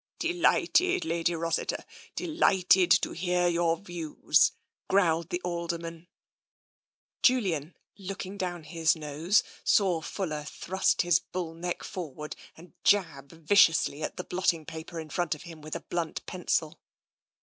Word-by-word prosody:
" - - -68
Delighted, 355 +1 +2
Lady 170 - 0
Rossiter, 165 0 -2 0.3
delighted 190 - +3
to - - +4
hear 180 0 +1
your 170 -1 +2
views," 175 -5 +1 0.4
growled 170 -4 +2
the 175 -2 -1
Alderman. 170 -1 -4 1.1
Julian, 185 - +2 0.2
looking 195 0 -6
down 180 -4 -4
his 165 +1 +1
nose, 155 +5 +1 0.2
saw 185 -5 +3
Fuller 160 -4 -4
thrust 185 +7 0
his 175 0 +4
bull 175 -3 -5
neck 175 +2 -4
forward 150 -4 -6 0.2
and 170 +2 -15
jab 155 -9 +2
viciously 165 -3 +3
at - - -4
the 180 - -3
blotting 175 -4 0
paper 160 +2 -7
in 155 -2 -8
front 175 0 0
of 150 - -12
him 165 -2 -11
with 155 +1 -6
a - - -4
blunt 170 -2 -3
pencil. 170 -3 -2
170 Hz, 135 wpm, -28 LUFS, 160-185 Hz, 1.1 s, to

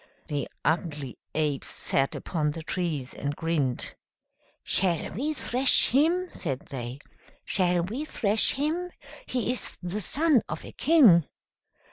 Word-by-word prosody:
The 145 -3 -3 0.2
ugly 150 -5 -1 0.2
apes 150 -3 0
sat 135 0 +1
upon 155 -4 -1
the 160 +2 -5
trees, 155 -8 -3
and 145 +1 -3
grinned. 150 -7 -1 0.7
"Shall 175 -4 +1
we 275 - -2
thrash 255 0 +3
him?" 330 +8 +3
said 135 -6 -3
they. 125 -1 -5 0.5
"Shall 180 -3 +2
we 230 - -4
thrash 215 -7 +2
him? 320 +6 -1 0.4
He 245 -1 -1
is 250 - -3
the 185 +4 -3
son 295 - +3
of - - -5
a - - -9
king!" 240 - +5
175 Hz, 130 wpm, -27 LUFS, -, 0.7 s, king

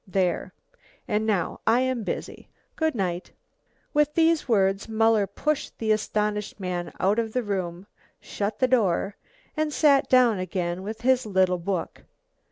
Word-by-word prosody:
There 185 -1 0 0.6
and 215 -1 0
now 195 -6 0
I 230 +3 +4
am 260 -3 -1
busy. - - -5 0.3
Goodnight." 195 - -2 0.6
With 300 0 +2
these 330 -2 +3
words 195 -1 +2
Muller 220 -2 +3
pushed 295 +9 -2
the 220 -1 0
astonished 210 -1 -1
man 180 -2 -3
out 200 +4 +2
of 225 -1 -2
the 250 - 0
room, 185 -3 -3 0.3
shut 205 +1 -4
the 255 - +2
door, 200 -5 +1 0.4
and 310 -1 0
sat 285 -2 +3
down 245 -6 +5
again 180 -1 -3
with 215 +3 -6
his 255 -1 +2
little 185 -2 +2
book. 180 0 -3
210 Hz, 145 wpm, -25 LUFS, 190-250 Hz, 0.6 s, down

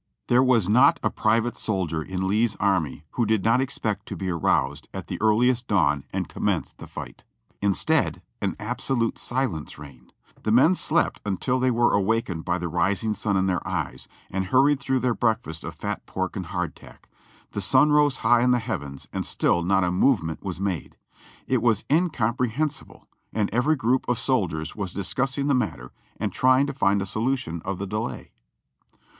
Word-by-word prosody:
There 120 +1 +5
was 125 -7 +3
not 110 +5 +5
a - - +1
private 115 +2 +1
soldier 90 -7 -2
in 95 +3 -3
Lee's 110 +3 +2
army 85 -7 0
who 120 - 0
did 110 -3 +1
not 115 +3 +3
ex 135 +1 -3
pect 105 -2 -3
to - - -5
be 95 -1 -3
aroused 75 -3 0
at 95 - -5
the 90 - -6
earliest 120 +3 +3
dawn 75 -8 +2
and - - -2
commence - - -1
the - - -11
fight. - - -9 0.4
Instead, 100 -5 +1 0.2
an - - -1
absolute 120 +2 -1
silence 120 - -2
reigned; 70 -4 -13 0.3
the - - -2
men 130 +10 +6
slept 170 -2 0
until 105 +6 -1
they 130 0 +2
were 120 0 +2
awakened 100 -4 0
by 90 - 0
the 85 -1 -3
rising 95 +6 0
sun 100 -1 -1
in 95 - +2
their 95 -1 0
eyes, 65 - -3 0.2
and 95 0 -1
hurried 135 +7 +3
through 130 -2 0
their 125 -1 +1
breakfast 105 -8 -1
of - - -6
fat - - -4
pork 95 0 -3
and 95 -4 -4
hardtack. 90 +1 -6 0.4
The 100 - -3
sun 130 +9 +4
rose 145 -3 +4
high 120 -1 +5
in 125 - +3
the 125 - +4
heavens 75 - -5
and - - -2
still 85 - +1
not 95 +2 +2
a 90 - +1
movement 90 - +1
was 95 -3 -5
made. 95 -7 -3 0.5
It 130 -3 +1
was 115 -3 +2
incom 150 -9 +2
prehensible, 140 +5 -2 0.3
and 105 -2 0
every 135 +7 +2
group 130 -1 0
of 125 - +1
soldiers 95 - -1
was 100 -4 -4
discussing 135 +8 -1
the 145 - +2
mat 125 -5 0
ter 65 +1 -12 0.3
and - - -2
trying 130 +2 +4
to 140 - -4
find 100 -6 +2
a - - -4
solution 110 -5 -2
of 95 0 -3
the 100 - -4
delay. 105 +4 -4
110 Hz, 185 wpm, -25 LUFS, 90-125 Hz, 0.5 s, men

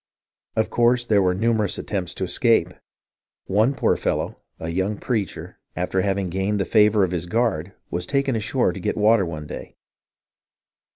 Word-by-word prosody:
Of 110 - 0
course 120 +1 +3
there 105 -3 +3
were 90 -1 +2
numerous 110 -1 +1
attempts 95 -5 -3
to - - -3
escape. 95 0 +2 0.8
One 110 +8 +2
poor - - +2
fellow, - - -2 0.2
a 80 - -4
young 95 +5 -1
preacher, 110 -5 -3 0.2
after 90 +1 0
having 95 -2 -1
gained 95 +3 -1
the 95 - 0
favour 105 -1 +4
of 90 - 0
his 90 -1 -3
guard, 100 -5 0 0.2
was 90 +1 -2
taken 140 -2 +1
ashore 110 -2 0
to 95 - -7
get - - -2
water 105 -2 +4
one 75 -2 -6
day. - - -8
100 Hz, 165 wpm, -23 LUFS, 90-110 Hz, 0.8 s, favour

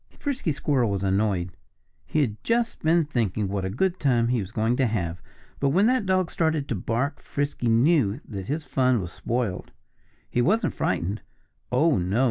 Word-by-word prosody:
Frisky 260 - -2
Squirrel 135 -5 +1
was 100 -1 -2
annoyed. 95 -2 +1 0.6
He 155 - +1
had 110 -6 -2
just 235 0 0
been 165 +1 +3
thinking 110 - -1
what 100 0 -2
a 95 - -1
good 180 - 0
time 120 -4 +2
he 125 -1 +2
was 95 -3 -4
going 115 +2 +1
to 130 - +3
have. 90 -6 -2 0.4
But 140 - +2
when 185 +9 +3
that 240 -4 +2
dog 185 -2 +1
started 160 -4 0
to 115 - 0
bark 120 +9 -2
Frisky 140 -4 -2
knew 120 -2 +3
that 95 -3 -6
his 150 +2 -2
fun 130 -2 +2
was 90 -3 -5
spoiled. 115 -6 -3 0.6
He 120 - 0
wasn't 210 - +2
frightened. 100 +6 -1 0.5
Oh, 145 - +3
no! 95 +6 0
125 Hz, 180 wpm, -25 LUFS, 100-155 Hz, 0.6 s, been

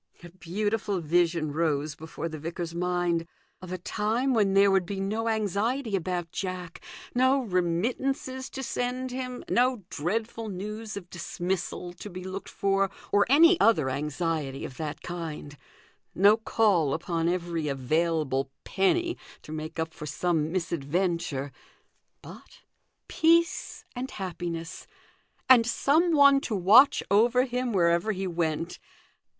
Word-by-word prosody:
A 175 - -9
beautiful 200 +3 -2
vision 165 -1 +1
rose 155 -2 0
before 160 +2 -6
the 155 -2 -7
vicar's 165 +2 -5
mind 175 -1 0 0.3
of 185 -1 -9
a 185 - -2
time 225 +8 0
when 200 -4 +2
there 200 0 +6
would 190 -1 +3
be 195 0 -4
no 215 +4 -2
anxiety 220 +3 0
about 175 -2 -3
Jack, 185 -3 -5 0.3
no 260 +2 +3
remittances 245 +8 -1
to 265 - -6
send 250 +1 -2
him, 255 -1 -5
no 250 -3 +2
dreadful 220 +7 -3
news 210 +3 -6
of 180 -3 -9
dismissal 175 +1 -4
to 180 +4 -9
be 180 -1 -8
looked 190 +1 -6
for, 195 0 +1 0.2
or 205 0 +4
any 330 +6 +6
other 155 -13 +3
anxiety 150 0 -2
of 130 - -9
that 155 -2 -5
kind; 160 -4 -6 0.6
no 200 +3 +6
call 205 -9 +2
upon 165 -1 -1
every 170 -3 -2
available 140 0 0
penny 345 - +1 0.2
to - - -10
make 155 +1 -6
up 160 0 -2
for 150 - -8
some 160 +1 0
misadventure: 165 -4 -1 0.7
but - - -13 0.5
peace 335 +2 +2
and 255 +2 -4
happiness, 175 -4 -5 0.6
and 245 -3 +7
some 310 +8 +2
one 280 -1 +6
to 225 - -3
watch 210 +9 +6
over 240 +5 +4
him 250 -1 -2
wherever 170 +2 +2
he 190 0 -3
went. 165 -1 -2
185 Hz, 135 wpm, -27 LUFS, 165-225 Hz, 0.7 s, and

